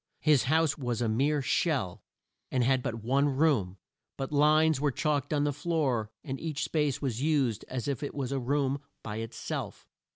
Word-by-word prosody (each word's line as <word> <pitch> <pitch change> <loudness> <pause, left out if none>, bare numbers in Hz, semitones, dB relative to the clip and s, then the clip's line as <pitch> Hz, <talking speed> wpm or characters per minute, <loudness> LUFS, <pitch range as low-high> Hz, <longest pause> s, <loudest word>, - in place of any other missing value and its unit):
His 145 -6 +4
house 160 +2 +2
was 120 -4 -2
a 120 - +1
mere 140 +6 +1
shell, 130 - 0 0.5
and 130 -2 +2
had 130 +1 +3
but 115 -2 -4
one 140 +5 +2
room, 130 - +1 0.4
but 135 +1 -4
lines 155 0 +4
were 145 - +3
chalked 145 0 -1
on 145 -1 +2
the 145 -1 +1
floor 140 -8 0
and 135 0 -5
each 155 -3 -3
space 150 -3 0
was 125 -3 -1
used 140 -8 +1
as 130 +1 -4
if 140 -4 -2
it 145 - -4
was 135 -3 -3
a 135 - 0
room 140 +1 0 0.2
by 105 -1 -5
it 115 0 -4
self. - - -5
140 Hz, 190 wpm, -29 LUFS, 125-150 Hz, 0.5 s, His